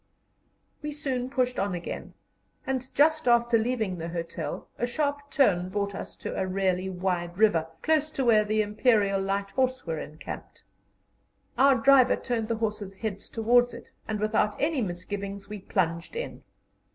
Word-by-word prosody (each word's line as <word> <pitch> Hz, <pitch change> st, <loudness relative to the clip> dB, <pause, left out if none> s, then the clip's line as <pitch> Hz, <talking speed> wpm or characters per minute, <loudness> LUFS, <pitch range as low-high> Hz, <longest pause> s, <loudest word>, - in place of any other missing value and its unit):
We 300 Hz, -1 st, -4 dB
soon 260 Hz, -4 st, -2 dB
pushed 250 Hz, -2 st, 0 dB
on 195 Hz, -2 st, 0 dB
again, 175 Hz, -, -6 dB, 0.5 s
and 260 Hz, -1 st, -2 dB
just 310 Hz, 0 st, +4 dB
after 235 Hz, 0 st, +4 dB
leaving 220 Hz, -5 st, 0 dB
the 165 Hz, +1 st, -4 dB
hotel 165 Hz, -2 st, -5 dB
a 240 Hz, -, +1 dB
sharp 285 Hz, +2 st, -2 dB
turn 185 Hz, -11 st, +3 dB
brought 200 Hz, +1 st, -2 dB
us 195 Hz, -, -7 dB
to -, -, -5 dB
a 190 Hz, -, -1 dB
really 185 Hz, 0 st, 0 dB
wide 180 Hz, -1 st, -2 dB
river, 175 Hz, -7 st, +3 dB, 0.2 s
close 310 Hz, -1 st, +2 dB
to 265 Hz, -, -1 dB
where 220 Hz, -3 st, +5 dB
the 215 Hz, +1 st, +1 dB
Imperial 210 Hz, -2 st, +2 dB
Light 195 Hz, +1 st, -1 dB
Horse 260 Hz, +2 st, 0 dB
were 160 Hz, -2 st, -2 dB
encamped. 155 Hz, +2 st, -8 dB, 0.9 s
Our 270 Hz, 0 st, +6 dB
driver 260 Hz, +1 st, +6 dB
turned 230 Hz, -3 st, -2 dB
the 230 Hz, -1 st, -1 dB
horses' 210 Hz, -3 st, -3 dB
heads 200 Hz, -1 st, -5 dB
towards 240 Hz, +2 st, +3 dB
it, -, -, -12 dB, 0.2 s
and 215 Hz, -1 st, -2 dB
without 210 Hz, 0 st, +1 dB
any 295 Hz, -2 st, +1 dB
misgivings 200 Hz, +1 st, -5 dB
we 210 Hz, 0 st, -6 dB
plunged 170 Hz, -, -1 dB
in. 480 Hz, +1 st, -5 dB
215 Hz, 160 wpm, -27 LUFS, 190-255 Hz, 0.9 s, Our